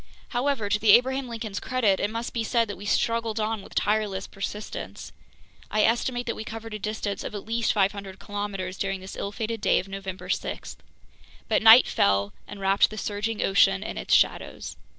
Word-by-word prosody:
However, 250 -3 0
to 210 +1 +1
the 210 -2 +6
Abraham 260 +1 +3
Lincoln's 220 -3 -4
credit, 225 -7 +1
it 205 - 0
must 230 +2 -4
be 230 - -1
said 230 +1 +1
that 205 - -5
we 205 - -8
struggled 230 0 0
on 215 0 -1
with - - -14
tireless 205 -2 0
persistence. 205 +2 -6 0.6
I 215 0 +2
estimate 245 +1 +1
that 230 - -2
we - - -6
covered 225 0 -7
a 215 - -4
distance 210 -1 -3
of - - -6
at 205 - -6
least 230 +1 +1
500 200 -1 -1
kilometers 200 -2 -5
during 195 -1 -1
this 190 +1 -9
ill 200 - -4
fated 225 +1 -4
day - - +3
of 185 - -2
November 195 -1 -6
6. - - -3 0.7
But 220 - +2
night 225 +3 +9
fell 100 0 +2
and 205 - -9
wrapped 195 +1 +3
the 215 - -9
surging 210 +2 -2
ocean 195 0 +4
in - - -5
its - - +2
shadows. - - 0
210 Hz, 190 wpm, -26 LUFS, 195-225 Hz, 0.7 s, night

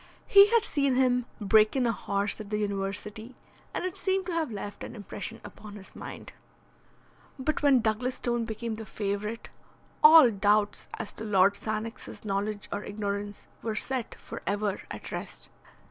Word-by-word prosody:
He 400 0 +8
had 460 0 +3
seen 280 -3 +1
him 250 -1 +2
break 215 +2 +4
in 260 -2 +2
a 235 - +3
horse 200 0 -1
at 205 - -9
the 210 - -1
university, 210 +3 -3 0.4
and - - -3
it 370 - -3
seemed 380 -1 0
to 365 - -3
have 325 -6 -1
left 205 -1 -6
an - - -7
impression 220 +2 -6
upon 210 -1 -11
his 195 -2 -11
mind. - - -9 1.0
But 290 +3 -1
when 275 -4 +5
Douglas 230 +3 0
Stone 240 -1 -1
became 225 +1 -4
the 220 0 -6
favourite, 210 +2 -3 0.5
all 305 -5 +9
doubts 205 0 +1
as 220 - -4
to - - -6
Lord 200 -2 +4
Sannox's 220 +3 -5
knowledge 205 +1 -2
or 205 - -3
ignorance 205 0 -4 0.2
were 220 -2 -3
set 255 +2 -2
for - - -9
ever 205 0 -1
at - - -7
rest. - - -7
215 Hz, 165 wpm, -28 LUFS, 205-250 Hz, 1.0 s, all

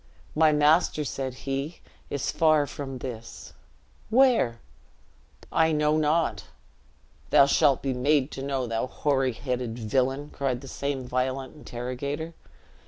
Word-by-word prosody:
"My 155 0 +5
master," 150 +1 +3
said 130 -1 -4
he, 140 +4 -3 0.3
"is 140 - -2
far 155 -2 +3
from 135 -1 -6
this." 115 -3 -8 0.6
"Where?" 230 - +4 0.9
"I 160 0 +3
know 150 0 +2
not." 155 +2 +1 0.8
"Thou 140 - +7
shalt 140 -1 +3
be 135 -1 0
made 140 +2 +2
to 135 - -6
know, 135 -2 -1
thou 115 +1 -2
hoary 135 -2 0
headed 125 -1 -3
villian!" 130 +5 -1
cried 130 -3 -2
the 135 - -10
same 135 -2 -3
violent 130 +1 -2
interrogator. 140 +4 -5
135 Hz, 125 wpm, -26 LUFS, 130-150 Hz, 0.9 s, Thou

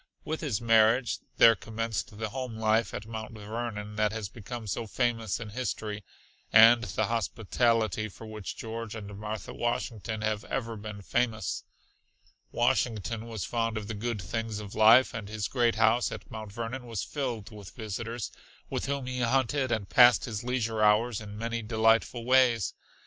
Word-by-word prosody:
With 160 +1 -3
his 135 -10 -1
marriage 115 +1 +4 0.2
there 115 - +8
commenced 110 -1 -4
the 110 0 -3
home 125 -2 -5
life 110 +1 +2
at 105 - -6
Mount 110 0 -6
Vernon 105 -1 -5
that 105 -1 +2
has 110 -2 -4
become 115 +2 -7
so 110 +3 -3
famous 115 -2 0
in 115 -2 -6
history, 105 -3 -4 0.5
and 115 +2 +8
the 105 +3 -1
hospitality 110 -1 0
for 110 - -12
which 110 -2 -7
George 115 -1 -5
and 105 -2 -7
Martha 105 +1 -5
Washington 115 -2 -2
have 110 0 -1
ever 115 -3 -3
been 105 -1 -8
famous. 110 -9 -1 0.9
Washington 115 -2 0
was 110 -6 -4
fond 115 -1 -1
of 105 -1 -5
the 110 - -4
good 110 +1 -3
things 110 +3 -3
of 105 -1 -8
life, 115 +5 +6
and 110 -4 -6
his 105 -1 -2
great 120 -3 +2
house 115 +2 +3
at - - -8
Mount 110 -2 -7
Vernon 120 +3 -5
was 115 -4 -3
filled 125 -8 -4
with 105 -3 -10
visitors, 115 +1 -5 0.4
with - - -2
whom 140 -2 -2
he 125 0 -3
hunted 130 +2 +1
and 105 -4 -1
passed 120 0 +6
his 110 -3 -4
leisure 115 -3 -1
hours 110 +1 +3
in 105 -1 -8
many 115 +1 -2
delightful 115 +2 +2
ways. 125 -5 +4
115 Hz, 165 wpm, -29 LUFS, 105-120 Hz, 0.9 s, there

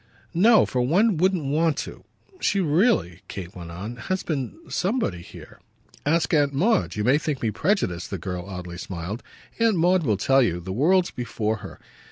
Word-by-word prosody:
"No 220 +6 +6
for 125 - -1
one 185 - +3
wouldn't 180 -2 +2
want 155 +2 +1
to. - - -11 0.4
She 200 - +1
really," 160 - +2
Kate 90 -2 -7
went 85 -2 -8
on, 100 +8 -7
"has 185 +11 -3
been 140 - -3
somebody 185 - -1
here. - - -13 0.5
Ask 165 +3 +2
Aunt 145 -2 +3
Maud 215 +11 +1
you 105 - -1
may 130 +6 +4
think 150 -5 -3
me 110 - +1
prejudiced," 95 - 0
the 95 - -3
girl 90 +1 -5
oddly 90 -2 -7
smiled. 95 +6 -5 0.4
"Aunt 230 -2 +3
Maud 180 +2 +3
will 110 -10 +1
tell 135 +6 +4
you 90 -8 +1
the 95 +2 -6
world's 175 - +3
before 110 -2 -2
her. 100 -2 -10
135 Hz, 180 wpm, -24 LUFS, -, 0.5 s, No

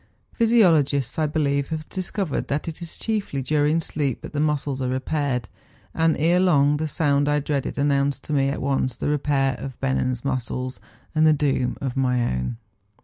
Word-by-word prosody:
Physiologists, 165 - +3
I 155 - +2
believe, 140 -2 0
have 155 -1 -5
discovered 185 -3 -3
that 145 +3 -2
it 165 +1 -6
is 170 - -6
chiefly 205 -11 -2
during 150 +3 +2
sleep 145 -5 -2
that - - -9
the 145 - -1
muscles 145 -3 0
are 130 - -1
repaired; 130 -2 -1 0.5
and 165 -1 +2
ere 170 +4 +3
long 145 -5 +4
the 155 +1 -2
sound 145 -2 +1
I 145 0 +2
dreaded 140 -2 -2
an¬ 140 - +1
nounced 140 -1 +1
to 150 - -5
me 135 -1 +2
at 140 - -3
once 135 -2 0
the - - -2
repair 140 -2 +1
of 135 -2 -7
Bennen's 130 -2 -1
muscles 130 -1 -3 0.3
and 155 0 +4
the 155 - +6
doom 140 -4 0
of 130 -3 -3
my 125 -2 +1 0.2
own. 65 - -3
145 Hz, 185 wpm, -23 LUFS, 135-155 Hz, 0.5 s, the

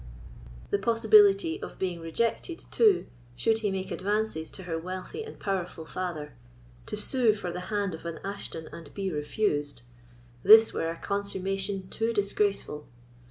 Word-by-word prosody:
The 200 - +2
possibility 205 -6 +5
of - - -7
being 180 -3 -2
rejected, 230 - -2
too, 425 -5 +4 0.3
should 220 - +2
he 215 -2 0
make 190 -1 -3
advances 205 -4 -1
to 190 - -8
her 165 -2 -3
wealthy 185 - -5
and 445 - -10
powerful 180 -4 -3
father—to 125 - -7
sue 225 0 +2
for 185 -4 -4
the 180 - -4
hand 205 -3 0
of 160 - -8
an 165 -1 -5
Ashton 195 -5 -5
and 160 -4 -10
be 195 -2 -2
refused—this 145 - +2
were 165 - -1
a 165 - -4
consummation 195 -1 -2
too 225 +1 -1
disgraceful. 200 -7 0
190 Hz, 140 wpm, -28 LUFS, 160-210 Hz, 0.3 s, possibility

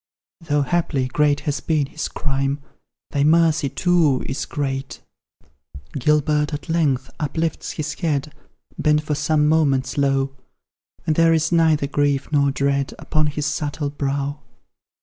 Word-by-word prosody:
Though, 150 -4 0
haply, 140 -3 0
great 145 +2 +2
has 145 -1 -2
been 155 -3 0
his 155 +3 -4
crime: 140 0 -2 0.5
Thy 140 - +1
mercy, 160 -2 +3
too, 165 -5 +2
is 140 - -3
great. 135 -1 -3 0.9
Gilbert, 150 +1 +1
at 145 - -9
length, 145 -6 +1
uplifts 160 +2 -2
his 150 0 -3
head, 150 -2 -2 0.5
Bent 150 0 +2
for 150 - -2
some 150 0 +2
moments 145 -4 +2
low, 135 -1 +1 0.7
And 155 - +1
there 165 0 +5
is 160 0 +1
neither 160 -3 +3
grief 145 0 0
nor 140 -2 +3
dread 140 0 0
Upon 155 -1 0
his 150 0 -2
subtle 145 -1 -2
brow. 140 0 -2
150 Hz, 135 wpm, -21 LUFS, 140-155 Hz, 0.9 s, there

